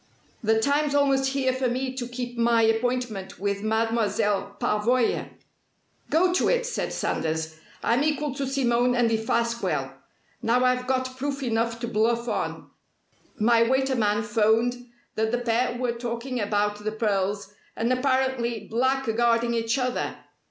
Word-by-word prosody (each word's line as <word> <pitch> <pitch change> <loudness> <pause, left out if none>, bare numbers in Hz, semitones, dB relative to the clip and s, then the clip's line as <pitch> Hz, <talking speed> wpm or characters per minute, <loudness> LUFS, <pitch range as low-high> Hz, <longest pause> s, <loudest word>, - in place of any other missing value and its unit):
"The 220 -1 +2
time's 285 +4 +1
almost 270 -1 +2
here 260 -2 +1
for 260 0 0
me 255 +2 -2
to 245 -2 -4
keep 245 0 -5
my 235 -1 +3
appointment 225 -3 -1
with 200 0 -2
Mademoiselle 215 -2 0
Pavoya." 230 +3 +1 0.8
"Go 355 +3 +3
to 365 - +2
it!" - - +1
said 485 - -3
Sanders. 160 0 -2 0.2
"I'm 240 +4 +2
equal 300 -2 0
to 275 -1 -3
Simone 245 -2 +2
and 240 -2 +2
Defasquelle. 235 +1 -1 0.5
Now 245 +3 +2
I've 250 0 +1
got 255 0 -1
proof 275 +1 -3
enough 230 -1 0
to 235 - -2
bluff 235 +2 +1
on 220 - -3 0.7
my 230 +2 +4
waiter 265 +3 +2
man 210 -1 +1
'phoned 230 +3 +1 0.3
that 220 0 0
the 245 - +1
pair 245 +1 0
were 245 -1 0
talking 235 +2 -4
about 205 0 0
the 215 - -1
pearls 200 -2 -1 0.2
and 235 +3 +1
apparently 255 -4 0
blackguarding 235 -1 +1
each 230 +2 0
other! 255 -1 -2
235 Hz, 145 wpm, -25 LUFS, 220-255 Hz, 0.8 s, my